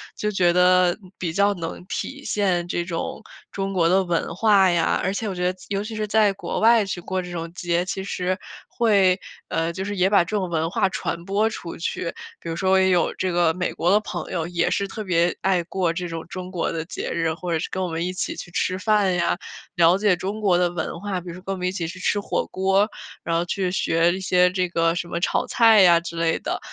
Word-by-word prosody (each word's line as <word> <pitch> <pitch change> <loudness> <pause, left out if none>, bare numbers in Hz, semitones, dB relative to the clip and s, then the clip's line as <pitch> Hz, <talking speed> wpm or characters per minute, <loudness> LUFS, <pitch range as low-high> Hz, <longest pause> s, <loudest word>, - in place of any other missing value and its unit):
就 210 - -2
觉 180 -3 +3
得 180 0 +4 0.2
比 170 -3 -3
较 200 +3 +3
能 170 0 -6
体 280 +7 -5
现 190 -8 0
这 175 - -1
种 170 -1 -4 0.3
中 195 0 -3
国 170 -3 +3
的 190 +2 +4
文 170 -1 -1
化 200 -1 +5
呀， 170 -1 +1
而 190 - 0
且 215 +2 -3
我 195 - -3
觉 180 0 0
得 185 - -15
尤 200 0 -2
其 220 +1 -6
是 215 0 -2
在 210 -1 +4
国 195 - -4
外 225 -1 +5
去 190 -2 -4
过 185 +2 -2
这 180 - -8
种 165 -1 -5
节 175 -1 0
其 190 0 -4
实 185 -1 -2 0.3
会， 195 -5 +3 0.3
呃 165 +1 -1
就 190 - -4
是 205 +1 -4
也 185 +1 +3
把 200 -3 +5
这 190 +5 -2
种 185 -3 -2
文 165 -1 0
化 185 - +1
传 170 -2 -4
播 205 +3 +1
出 170 -6 -7
去， 170 0 -3 0.3
比 - - -10
如 165 - -3
说 190 +2 +3
也 190 0 +3
有 180 -2 +2
这 185 - -1
个 170 -2 +2
美 180 0 -2
国 175 +2 +1
的 205 - +5
朋 - - -6
友 170 -3 -1
也 170 -1 0
是 200 - 0
特 215 +2 -6
别 175 -2 +1
爱 185 -2 +2
过 175 -1 -1
这 175 +1 -4
种 165 -1 -6
中 185 +1 -7
国 175 -3 -1
的 165 -1 -3
节 - - -5
日。 165 -1 0
或 175 +2 -5
者 165 - +1
是 - - -3
跟 190 - -2
我 - - -1
们 165 0 -2
一 180 - -2
起 185 - -3
去 - - -8
吃 185 +1 -1
饭 205 -1 +2
呀， 175 0 +1 0.4
了 170 +1 +5
解 200 -2 +3
中 195 +4 -4
国 190 -4 +3
的 175 0 +2
文 170 -1 -4
化， 195 -1 -3
比 180 - -14
如 170 - -5
说 185 - -10
跟 195 - -3
我 - - -5
们 180 0 -2
一 - - 0
起 175 -3 -3
去 180 +3 -8
吃 205 +2 +1
火 200 - -2
锅， 195 +2 +2 0.3
然 165 - -1
后 170 +1 +1
去 185 0 -1
学 170 -2 +2
一 185 - -4
些 180 -1 +3
这 185 0 0
个 165 -1 +2
什 175 0 -3
么 170 - -3
炒 - - +1
菜 225 -3 +6
呀 175 -2 +7
之 170 0 -8
类 165 -1 +1
的， - - -3
180 Hz, 270 characters per minute, -23 LUFS, 170-195 Hz, 0.4 s, 呀